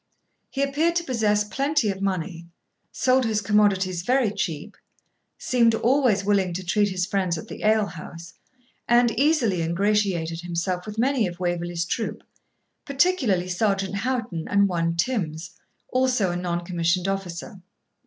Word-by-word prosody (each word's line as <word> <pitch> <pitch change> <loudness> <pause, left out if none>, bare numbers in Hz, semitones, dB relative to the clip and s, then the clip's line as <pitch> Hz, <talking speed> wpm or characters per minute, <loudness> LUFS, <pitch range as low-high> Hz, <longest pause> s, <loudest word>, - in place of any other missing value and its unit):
He 275 - -1
appeared 305 +5 +1
to 340 - +1
possess 215 -7 +1
plenty 275 +1 0
of 195 0 -7
money, 175 -3 -3 0.4
sold 260 0 +2
his 220 -2 0
commodities 200 -4 +2
very 245 +2 +2
cheap, 165 -7 -4 0.6
seemed 235 -3 +2
always 240 -5 +2
willing 195 -3 +2
to 185 +1 -5
treat 205 +3 +2
his 185 -1 -1
friends 185 -3 -1
at - - -8
the - - -9
ale 215 0 +3
house, 170 -1 -10 0.5
and 240 0 +4
easily 240 - +2
ingratiated 170 -2 0
himself 175 +2 -3
with 210 0 -7
many 250 -2 +2
of 175 0 -8
Waverley's 175 -1 -2
troop, 220 +6 -3 0.6
particularly 275 - +1
Sergeant 195 +1 0
Houghton 225 -7 -2
and 200 0 +3
one 165 -2 -1
Tims, 170 -4 -2 0.4
also 255 -7 +1
a - - -3
non 175 -1 -2
commissioned 175 +1 0
officer. 195 -1 -5
195 Hz, 145 wpm, -24 LUFS, 175-235 Hz, 0.6 s, and